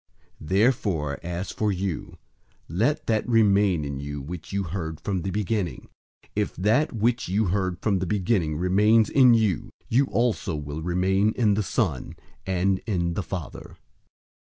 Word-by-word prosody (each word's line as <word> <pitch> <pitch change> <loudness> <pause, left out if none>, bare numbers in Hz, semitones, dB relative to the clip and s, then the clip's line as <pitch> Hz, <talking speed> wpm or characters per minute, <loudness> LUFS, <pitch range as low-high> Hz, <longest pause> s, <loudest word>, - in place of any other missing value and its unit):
002:024 75 - -10
Therefore, 95 - +1
as 90 +2 -4
for 105 -1 0
you, 95 -3 -4 0.5
let 120 - 0
that 110 +1 0
remain 100 -7 +3
in 70 -1 -4
you 75 +1 -5
which 80 +5 -8
you 100 0 -1
heard 80 -3 -5
from 95 -3 -2
the 95 - -3
beginning. 100 -1 -2 0.5
If - - -1
that 110 - +2
which 120 +1 0
you 105 +4 +1
heard 95 -3 -1
from 100 -4 +2
the 95 - -2
beginning 90 -5 0
remains 105 +5 +3
in 130 -4 +6
you, 105 -7 0 0.2
you 130 +5 +3
also 115 - 0
will 75 +1 -5
remain 95 +5 +1
in 110 -4 +3
the 105 - +1
Son, 95 - -2 0.3
and 95 +1 +1
in 85 -5 0
the 100 - -2
Father. 90 -2 -7
95 Hz, 160 wpm, -25 LUFS, 85-110 Hz, 0.5 s, in